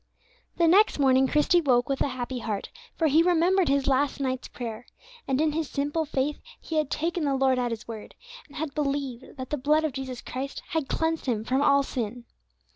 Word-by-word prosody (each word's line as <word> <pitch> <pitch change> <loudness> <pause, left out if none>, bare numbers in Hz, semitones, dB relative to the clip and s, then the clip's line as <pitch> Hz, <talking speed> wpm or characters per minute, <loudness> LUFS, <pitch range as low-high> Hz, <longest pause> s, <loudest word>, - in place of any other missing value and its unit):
The 340 - +4
next 395 +6 +5
morning 265 -2 +4
Christie 300 +5 +3
woke 245 -5 +2
with 275 -1 -2
a - - +3
happy 255 -1 -4
heart, 215 -3 -4 0.2
for 325 - 0
he 310 +2 +5
remembered 355 +1 +3
his 275 -1 +2
last 275 +1 +1
night's 260 -1 -2
prayer, 235 -1 -7 0.4
and 265 0 +1
in 310 0 +2
his 315 -1 -2
simple 290 +3 -1
faith 285 0 -2 0.2
he 320 - -4
had 305 -3 +1
taken 335 +2 -1
the 280 -2 +1
Lord 265 -1 +2
at 245 -1 0
His 230 -2 -6
word, 225 -2 -8 0.3
and 285 - -17
had 305 -2 -4
believed 275 -4 -3
that 260 -1 -7
the 300 - 0
blood 300 +4 +2
of 310 -4 -1
Jesus 260 -2 -5
Christ 270 +2 -5
had 320 -6 -2
cleansed 320 -2 -1
him 220 -4 0
from 260 +4 0
all 280 -1 +4
sin. 240 -2 -4
275 Hz, 205 wpm, -26 LUFS, 255-310 Hz, 0.4 s, next